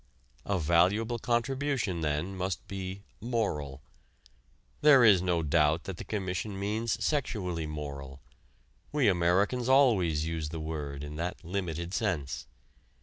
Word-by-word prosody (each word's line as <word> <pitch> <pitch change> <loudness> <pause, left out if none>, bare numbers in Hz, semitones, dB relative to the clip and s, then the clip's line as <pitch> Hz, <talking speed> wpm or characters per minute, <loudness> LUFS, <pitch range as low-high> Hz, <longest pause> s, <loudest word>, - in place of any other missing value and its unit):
A 100 - +1
valuable 95 +9 +2
contribution, 120 - 0
then, 75 +5 -1
must 95 0 -3
be 95 0 -6 0.2
moral. 75 - -2 1.0
There 145 -4 +7
is 100 -6 +7
no 90 -2 +1
doubt 80 +1 +2
that 95 -3 -6
the - - -6
Commission 95 0 -3
means 110 +3 -1
sexually 100 - -1
moral. 70 -2 -6 0.7
We 145 -5 +2
Americans 100 +7 +2
always 95 - +4
use 80 -2 -3
the 80 +1 -5
word 75 -3 -5
in 75 +1 -7
that 90 +1 -4
limited 85 -1 -3
sense. 85 - -2
90 Hz, 125 wpm, -30 LUFS, 80-110 Hz, 1.0 s, There